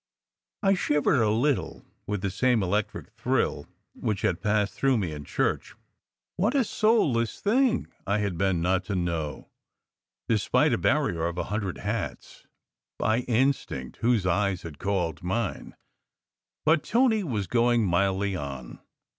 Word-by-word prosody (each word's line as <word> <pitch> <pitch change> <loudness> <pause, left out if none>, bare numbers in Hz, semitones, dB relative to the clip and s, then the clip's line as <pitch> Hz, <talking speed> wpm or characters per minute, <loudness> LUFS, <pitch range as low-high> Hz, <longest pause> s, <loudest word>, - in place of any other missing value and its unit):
I 195 0 +5
shivered 150 -7 +2
a 110 - +3
little 125 +6 0 0.2
with 105 -2 -3
the 100 - 0
same 120 +1 +2
electric 100 +3 -2
thrill - - -1 0.3
which 105 -3 -3
had 90 -2 0
passed 105 -2 +1
through 135 -2 +2
me 95 -7 -2
in 75 -1 -7
church. - - -1 0.6
What 210 +9 +1
a 270 - +4
soulless 180 - +1
thing 240 +3 +2 0.2
I 100 +1 +2
had 100 -4 -1
been 90 -1 +1
not 95 +1 +1
to 100 - -3
know, 85 -4 -3 0.8
despite 110 -3 +2
a - - +1
barrier 80 0 +1
of 85 0 -5
a - - 0
hundred 100 -4 -2
hats, 105 +1 -5 0.5
by 110 +2 +1
instinct 120 - -1
whose 115 -5 +1
eyes 95 0 +1
had 80 -4 -9
called 90 -6 -1
mine. 95 +4 -3 0.9
But 155 0 +4
Tony 230 -3 +2
was 110 - -2
going 120 +2 +2
mildly 95 +2 +1
on. 70 -6 -6
105 Hz, 145 wpm, -27 LUFS, 90-125 Hz, 0.9 s, I